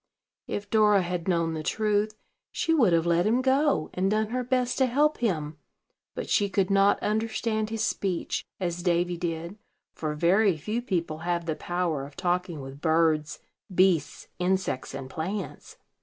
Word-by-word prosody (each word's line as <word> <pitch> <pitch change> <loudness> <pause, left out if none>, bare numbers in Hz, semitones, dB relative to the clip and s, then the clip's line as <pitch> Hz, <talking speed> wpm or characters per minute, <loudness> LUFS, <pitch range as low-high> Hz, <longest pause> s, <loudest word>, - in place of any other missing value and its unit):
If 205 0 -4
Dora 210 -3 +5
had 175 0 -3
known 170 -3 +1
the 160 - -3
truth, 215 +4 0 0.4
she 325 - 0
would 240 - +4
have 165 0 +3
let 170 +2 +2
him 235 +3 +3
go, 265 - +2
and 190 +1 +1
done 215 +1 +1
her 250 +2 -1
best 250 0 0
to 260 - +4
help 295 +5 +2
him; 160 -9 -1 0.6
but - - -4
she 200 -1 +2
could 195 0 +1
not 195 +1 +4
understand 220 0 -1
his 225 -1 -2
speech, 185 -4 -1 0.2
as 175 -2 -2
Davy 175 0 +1
did, 170 +3 -4 0.3
for 155 -1 -3
very 180 +3 +3
few 215 +9 -3
people 170 -9 -2
have 170 0 -2
the 160 -2 -1
power 175 -5 -2
of 140 0 -10
talking 175 -3 -1
with 135 +1 -10
birds, 160 -2 +1 0.3
beasts, 180 -5 +2
insects, 180 -8 -1
and 135 -1 -6
plants. 180 +9 -5
180 Hz, 165 wpm, -27 LUFS, 165-215 Hz, 0.6 s, Dora